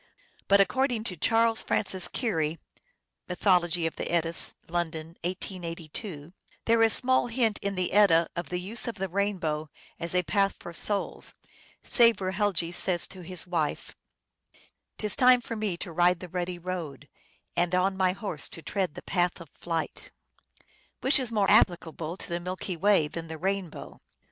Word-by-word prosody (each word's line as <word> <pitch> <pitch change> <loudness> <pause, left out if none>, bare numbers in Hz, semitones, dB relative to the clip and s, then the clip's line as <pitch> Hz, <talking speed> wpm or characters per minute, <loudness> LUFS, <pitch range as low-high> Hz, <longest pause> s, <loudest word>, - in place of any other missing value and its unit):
But 200 0 +5
according 240 +4 +2
to 190 -5 -4
Charles 225 +6 +2
Francis 190 -2 +1
Keary 165 - -1 0.7
{Mythology 175 -2 +2
of 165 - -3
the - - -4
Eddas, 170 -1 +1
London, 165 -2 -3
1882), 170 -2 -5 0.2
" - - -34
there 230 0 +3
is 225 -1 +5
small 255 +1 +2
hint 230 -3 0
in 200 0 -2
the 185 -1 -1
Edda 180 -5 +5
of 175 0 -4
the 180 - -2
use 205 +8 -3
of 235 - -3
the 195 -1 -3
rainbow 175 -6 -1 0.3
as 170 +1 -1
a 180 - +3
path 195 +5 +1
for 170 - -9
souls, 200 +4 -2 0.5
save 235 -3 +5
where 185 -1 -2
Helgi 190 -4 0
says 175 0 +2
to 185 - -10
his 180 +1 -1
wife, 170 -4 -2 0.5
" - - -33
T - - -5
is 210 - +1
time 250 -1 +6
for 230 -1 -6
me 210 -5 -2
to 175 - -6
ride 175 +1 +3
the 180 - -9
ruddy 180 0 -3
road, 170 -6 -6 0.5
And 175 +1 +1
on 190 +1 +2
my 185 -1 +2
horse 195 -7 -4
to 165 - -9
tread 190 -6 -2
the - - -9
path 175 -1 0
of 170 -4 -11
flight, 165 -2 -4 0.5
" - - -34
which 270 +3 +6
is 250 -3 -2
more 210 -3 +2
applicable 170 -1 +2
to - - -8
the 170 0 -2
Milky 185 +1 -4
Way 190 -2 +3
than 165 +2 -7
the 160 0 -7
rainbow. 190 -1 -4
180 Hz, 175 wpm, -28 LUFS, 170-205 Hz, 0.7 s, time